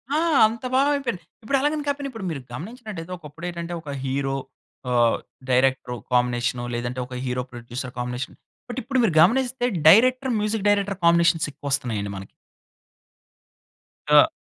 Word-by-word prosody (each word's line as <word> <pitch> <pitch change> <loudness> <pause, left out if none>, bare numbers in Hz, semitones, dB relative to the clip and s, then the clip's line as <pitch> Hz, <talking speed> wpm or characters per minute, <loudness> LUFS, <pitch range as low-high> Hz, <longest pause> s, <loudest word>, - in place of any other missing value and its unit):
ఆ! - - +3 0.3
అంత 230 +3 -6
బాగా 275 +2 +4
అయిపోయింది. 225 - -3 0.2
ఇప్పుడు 275 +5 +1
అలాగని 295 +1 0
కాకపోయినా, 285 -1 -2
ఇప్పుడు 225 -5 -7
మీరు 140 -4 -5
గమనించినట్లైతే 190 - -7
ఒకప్పుడేటంటే 170 +2 -6
ఒక 150 - -10
హీరో, 135 0 -1 0.6
ఆహ్, 120 -1 +3 0.3
డైరెక్టరు 130 -1 +2 0.2
కాంబినేషను 125 0 +1
లేదంటే, 120 +1 -3
ఒక 125 - -8
హీరో 125 0 -1
ప్రొడ్యూసర్ 120 +2 -7
కాంబినేషన్. 125 +1 -4 0.3
బట్, 245 +2 -3
ఇప్పుడు 265 +1 0
మీరు 185 -8 +2
గమనిస్తే 245 +5 +3 0.2
డైరెక్టర్, 255 +6 +5
మ్యూజిక్ 210 0 -1
డైరెక్టర్ 200 -1 +1
కాంబినేషన్స 170 -2 +4
ఎక్కువస్తున్నాయండి 120 -8 -2
మనకి. 95 - -8 1.8
అ! - - +7
165 Hz, 135 wpm, -24 LUFS, -, 1.8 s, అ